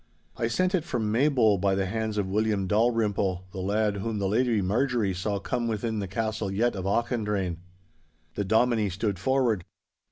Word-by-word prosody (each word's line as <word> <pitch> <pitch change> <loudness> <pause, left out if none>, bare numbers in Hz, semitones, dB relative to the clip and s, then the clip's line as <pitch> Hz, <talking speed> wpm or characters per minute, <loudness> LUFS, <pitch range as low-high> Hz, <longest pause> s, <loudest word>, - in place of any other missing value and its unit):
I 115 - -1
sent 185 - +1
it 180 -5 +1
from 115 -9 -2
Maybole 115 -5 +3
by 100 0 +2
the 95 0 0
hands 110 +2 -2
of 100 - +1
William 105 0 0
Dalrymple, 105 -3 +1
the 95 - -7
lad 105 +2 0
whom 110 +2 -3
the 100 -1 0
Lady 115 +2 +2
Marjorie 110 +1 +1
saw 100 +3 -2
come 115 +4 -2
within 110 0 -2
the 100 - -3
castle 110 0 -2
yett 115 +4 +1
of 95 -1 -4
Auchendrayne.' 105 -5 0 0.8
The 100 - -2
Dominie 110 +1 +2
stood 100 0 -2
forward. 120 -4 +1
105 Hz, 170 wpm, -27 LUFS, 100-115 Hz, 0.8 s, Maybole